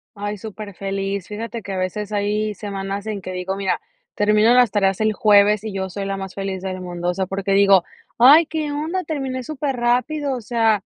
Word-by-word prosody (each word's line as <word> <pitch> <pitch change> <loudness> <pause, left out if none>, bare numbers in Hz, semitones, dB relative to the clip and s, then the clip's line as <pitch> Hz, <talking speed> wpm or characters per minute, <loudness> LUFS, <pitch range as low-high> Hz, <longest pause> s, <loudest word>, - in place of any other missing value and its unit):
Ay, 205 +1 -4
superfeliz. 195 -2 -5
Fíjate 225 +2 -5
que 195 - -6
a - - -3
veces 205 +3 -3
hay 210 +1 0
semanas 200 0 -5
en 215 -2 -3
que 185 - -6
digo, 185 +1 -3
mira, 195 -1 -1 0.3
termino 210 +2 +4
las 245 -2 +5
tareas 195 -1 +1
el 215 0 +2
jueves, 210 0 +4
y 215 - -4
yo 190 -1 -3
soy 195 +2 -4
la 195 0 -2
más 190 -1 -7
feliz 195 -1 -4
del 185 -1 -4
mundo. 175 -1 -4
O - - -3
sea, 190 +1 -1
porque 195 +1 -2
digo: 195 -2 +5 0.3
"Ay, 290 +7 +8
¿qué 310 -2 -3
onda?, 325 +6 -2
terminé 265 -4 -3
superrápido", 270 0 -1
o 250 - -4
sea, 225 -3 +1
205 Hz, 195 wpm, -21 LUFS, 195-235 Hz, 0.3 s, Ay